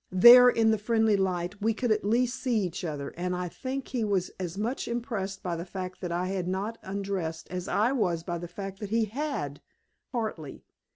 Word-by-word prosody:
There, 240 +7 +10
in 225 -2 +3
the 220 - +1
friendly 220 0 +3
light, 190 0 -1
we 225 +1 +1
could 245 0 0
at 215 0 +2
least 245 +4 +1
see 240 -5 +1
each 185 -1 -3
other, 145 -4 -3
and 180 +1 -2
I 180 0 -2
think 260 +8 -5
he 245 -3 -1
was 195 -4 0
as 180 0 -4
much 230 +6 -2
impressed 225 -5 -3
by 175 -2 -2
the 165 - -4
fact 185 0 -6
that 180 -2 -3
I 180 +2 -1
had 190 -2 -2
not 200 +5 -2
undressed 190 -4 -4
as 180 0 -4
I 220 +5 +2
was 175 -11 0
by 175 -1 -3
the 175 - -6
fact 195 +2 -7
that 210 - -5
he 225 +1 +2
HAD, 215 - -4 0.5
partly. 215 - -4
195 Hz, 210 wpm, -28 LUFS, 180-225 Hz, 0.5 s, There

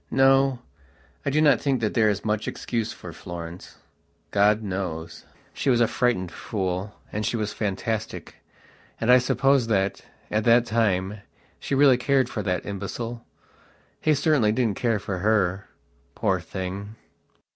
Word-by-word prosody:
No, 135 0 +4 0.7
I - - +4
do 150 +3 +2
not 150 -2 +4
think 135 -3 +1
that 110 -2 -1
there 110 -2 +4
is 100 0 -2
much 105 0 -1
excuse 115 -3 -3
for - - -9
Florence. 85 0 -8 0.5
God 105 +2 +3
knows. 90 -4 -5 0.3
She 140 - -1
was 120 -2 +4
a 120 - +4
frightened 110 -9 0
fool, 95 0 -3 0.2
and 105 - -3
she 115 - -1
was 105 -1 -2
fantastic, 110 +1 -3 0.7
and 115 +2 +3
I 125 - +8
suppose 135 0 +2
that, 100 -3 0 0.3
at 105 0 +1
that 120 0 +5
time, 105 -3 0 0.4
she 140 - -2
really 135 -2 +6
cared 130 0 +2
for 110 - -3
that 90 -4 -2
imbecile. 115 +4 -5 0.8
He 155 -1 +2
certainly 140 -6 +3
didn't 110 -3 0
care 115 -3 +1
for 95 -2 -4
her. 100 -1 +1 0.5
Poor - - +1
thing.... 95 +3 -6
110 Hz, 150 wpm, -25 LUFS, 100-125 Hz, 0.8 s, I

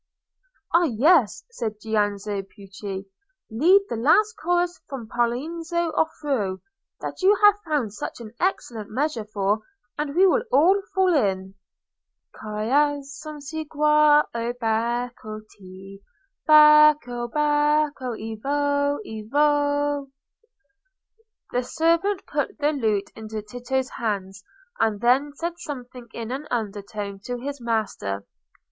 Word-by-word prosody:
"Ah, 340 +1 +5
yes!" 270 - +3
said 220 - -4
Giannozzo 205 -2 -1
Pucci, 195 0 -8 0.5
"lead 350 - +5
the - - -3
last 415 - +3
chorus 350 -2 -1
from 260 -5 -6
Poliziano's 265 +9 -2 0.2
'Orfeo,' 270 -12 -1 0.4
that - - -6
you 390 +3 +5
have 415 0 +6
found 285 -10 -1
such 210 - -6
an 225 -2 -9
excellent 240 - -2
measure 255 -1 -2
for, 205 0 0 0.4
and 300 -1 -2
we 375 +2 +6
will 390 +6 +4
all 370 +8 +5
fall 375 -2 +3
in:— 190 - 0 0.8
"'Ciascum 280 +7 -2
segua, 300 0 +3
o 235 +1 -2
Bacco, 230 -1 -2
te: 195 +1 -13 0.5
Bacco, 300 -5 +6
Bacco, 295 -3 +1
evoe, 285 +6 -1
evoe!'" 290 +4 0 1.4
The 245 - +1
servant 335 +9 +1
put 290 -1 -3
the 295 0 +1
lute 215 -7 -1
into 220 -1 -6
Tito's 245 +4 -3
hands, 195 -3 -4 0.4
and 215 -2 +1
then 265 +5 +2
said 340 +2 -4
something 250 -4 -8
in 230 0 -6
an 280 +4 -5
undertone 205 -3 -4
to 245 0 -3
his 280 +2 -6
master. 200 - -2
255 Hz, 115 wpm, -24 LUFS, 215-300 Hz, 1.4 s, have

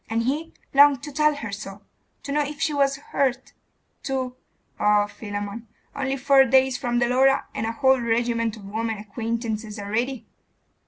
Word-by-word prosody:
And 225 +1 0
he 300 +6 -2 0.2
longed 280 -2 +6
to 295 - -6
tell 300 +1 +2
her 255 -7 -6
so 200 0 -8 0.4
to 280 - -5
know 295 +1 +2
if 290 0 -4
she 300 - 0
was 275 -1 +2
hurt 270 -2 -2 0.5
to 260 -2 -3 0.4
Oh, 210 0 +4
Philammon! 205 +2 -6 0.3
only 270 -1 -1
four 275 0 +5
days 265 0 +3
from 240 -1 -1
the 240 0 +2
Laura, 265 +2 +3
and 220 - -2
a - - -1
whole 265 +2 +3
regiment 230 -1 0
of 205 - -12
women 220 +2 -3
acquaintances 220 +1 -4
already! 230 +5 -2
240 Hz, 165 wpm, -24 LUFS, 220-275 Hz, 0.5 s, longed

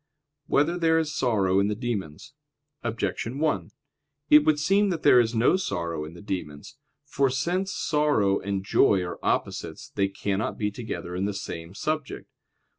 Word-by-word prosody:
3] - - -9
Whether 160 +5 +3
There 160 -1 +3
Is 155 -1 -1
Sorrow 100 -6 +2
in 100 - +2
the 105 - -1
Demons? 115 - -5 0.5
Objection 115 +2 -3
1: 155 0 0 0.6
It 150 - +10
would 155 -1 +3
seem 195 +6 +3
that 170 -4 -3
there 125 - +7
is 115 -1 +1
no 115 +11 +4
sorrow 85 - -3
in 80 +2 -10
the 85 - -12
demons. 75 - -6 0.3
For 140 -1 +1
since 175 +9 -1
sorrow 150 - +1
and 100 -1 -3
joy 95 -2 +3
are 85 - -6
opposites, - - -2
they 100 - +1
cannot 100 +1 -2
be 105 -1 -1
together 105 -5 -6
in 95 +2 -1
the 100 -1 -2
same 85 -2 -7
subject. 155 0 -4
115 Hz, 170 wpm, -26 LUFS, 95-150 Hz, 0.6 s, It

